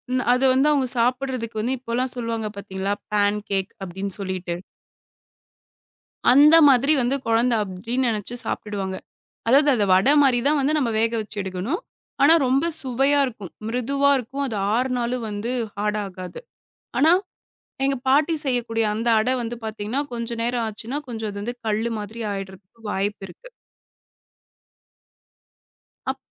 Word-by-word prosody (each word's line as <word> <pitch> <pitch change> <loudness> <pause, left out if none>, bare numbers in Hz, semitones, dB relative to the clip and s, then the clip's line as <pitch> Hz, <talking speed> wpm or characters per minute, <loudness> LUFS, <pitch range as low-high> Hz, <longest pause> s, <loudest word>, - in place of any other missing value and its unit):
ன் 255 - +1
அத 250 - +1
வந்து 275 +3 +3
அவுங்க 270 -3 +2
சாப்பிடுறதுக்கு 245 -2 -1
வந்து, 255 +3 -1
இப்போல்லாம் 250 +1 -2
சொல்லுவாங்க 230 -2 -3
பாத்தீங்களா 195 0 -3 0.2
பேன்கேக் 205 -2 0
அப்டின்னு 190 +1 -4
சொல்லிட்டு. 185 -2 -3 1.8
அந்த 295 +5 +7
மாதிரி 275 +3 +5
வந்து 250 +3 +1
கொழந்தை 230 +1 +3
அப்டினு 225 +7 -3
நெனச்சு 220 +1 -3
சாப்ட்டுடுவாங்க. 195 -3 -3 0.5
அதாவது 285 +4 +5
அத 210 -3 +2
வடை 240 +10 +4
மாரி 255 -3 +4
தான் 300 0 +3
வந்து 300 +3 +1
நம்ம 245 -5 0
வேக 230 +1 +1
வச்சு 210 0 -9
எடுக்கணும். 190 - -3 0.4
ஆனா 315 +3 +7
ரொம்ப 270 +5 +2 0.2
சுவையா 270 +3 +2
இருக்கும். 210 -7 -8 0.2
மிருதுவா 275 +4 +1
இருக்கும். 270 +4 -4
அது 225 -5 -4 0.2
ஆருநாளும் 245 -1 -1
வந்து 205 +4 -4 0.3
ஹார்ட் 210 0 0
ஆகாது. 185 - -8 0.6
ஆனா, 315 +4 +6 0.7
எங்க 275 0 +2
பாட்டி 295 +5 +4
செய்யக்கூடிய 235 -3 0
அந்த 225 +2 -3
அட 235 +4 0
வந்து 235 +1 -4
பாத்தீங்கன்னா, 220 +5 -3
கொஞ்ச 235 0 -4
நேரம் 240 -1 0
ஆச்சுன்னா 225 +6 -5
கொஞ்சம் 220 -3 -4
அது 240 +2 -3
கல்லு 220 +2 0
மாதிரி 215 +3 -8
ஆயிடுறதுக்கு 195 +3 -8
வாய்ப்பு 200 +1 -2
இருக்கு. - - -15 2.6
அப் 265 - -10
235 Hz, 135 wpm, -23 LUFS, 205-260 Hz, 2.6 s, அந்த